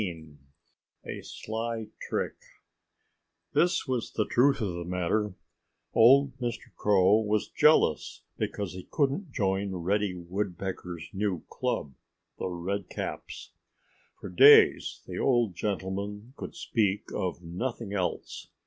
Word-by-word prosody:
*XVI* 80 -6 -6 0.7
*A - - -6
SLY 110 0 -4 0.2
TRICK* - - -1 1.2
This 175 +2 +2
was 125 -3 -2
the 105 - +1
truth 135 +3 +3
of 100 -6 -1
the 85 0 -4
matter: 90 +3 -1 0.6
Old 130 +3 +6
Mr. 120 -2 -4
Crow 100 +1 +4
was 105 -1 0
jealous 150 - +3
because 100 -3 -3
he 90 0 -9
couldn't 145 +4 0
join 95 -3 -1
Reddy 95 +2 0
Woodpecker's 90 -1 -4
new 95 -4 -1
club, 70 -2 -2 0.5
The - - -2
Redcaps. 90 +2 -5 0.7
For - - -7
days 90 - +6
the - - -6
old 120 -6 +2
gentleman 100 +4 -4
could - - -8
speak 105 -3 0
of 90 -1 -3
nothing 100 +5 -4
else. 95 -3 -3
100 Hz, 115 wpm, -28 LUFS, 90-115 Hz, 1.2 s, Old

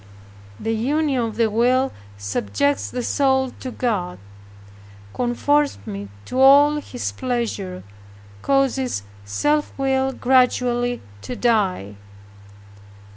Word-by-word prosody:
The 225 - -1
union 275 +3 0
of 225 -2 -3
the 230 0 +2
will 255 +4 +2 0.3
subjects 100 +3 -1
the 245 - -4
soul 265 -1 +1
to 260 - -5
God, 210 -8 -2 1.0
conforms 285 +4 +1
it 100 0 -6 0.2
to 255 - -3
all 285 +3 +7
His 260 -4 -4
pleasure, 230 -7 -3 0.6
causes 265 - +1 0.2
self 295 - 0
will 265 -1 +1
gradually 245 -1 +2 0.2
to 250 - -6
die. 195 - 0
245 Hz, 100 wpm, -22 LUFS, 210-265 Hz, 1.0 s, all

